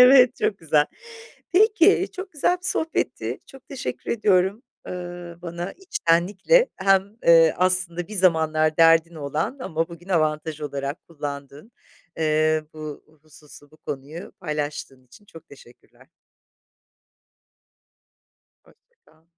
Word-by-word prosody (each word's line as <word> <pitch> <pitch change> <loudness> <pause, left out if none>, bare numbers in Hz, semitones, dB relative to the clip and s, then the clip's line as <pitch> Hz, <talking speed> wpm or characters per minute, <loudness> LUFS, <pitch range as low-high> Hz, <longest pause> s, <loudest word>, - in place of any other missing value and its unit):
Evet, 250 0 +7
çok 200 - -1
güzel. 150 -2 +2 0.7
Peki, 400 -1 +4
çok 375 -2 -8
güzel 300 +4 +1
bir - - -3
sohbetti, 320 0 -1
çok 270 -1 -16
teşekkür 125 - -5
ediyorum, 200 0 +2 0.3
ııı, 175 -1 -7
bana 175 +2 -5
içtenlikle 370 - +2
hem, 195 +2 +2
ııı, 165 -1 +7
aslında 180 -1 +1
bir 215 - -8
zamanlar 160 -4 +2
derdin 165 0 +5
olan 155 - -3
ama 165 -5 -2
bugün 170 +2 -13
avantaj 155 -2 0
olarak 140 0 -5
kullandığın, 145 - -8 0.5
eee, 155 0 +1
bu 155 -2 -8 0.2
hususu, 150 -2 -15
bu 155 - -20
konuyu 145 +7 -8
paylaştığın 150 -5 -5
için 205 +11 -19
çok 165 -5 -15
teşekkürler. 125 -1 -19 2.6
Hoşça 475 - -27
kal. 160 +1 -27
165 Hz, 115 wpm, -23 LUFS, 155-200 Hz, 2.6 s, Evet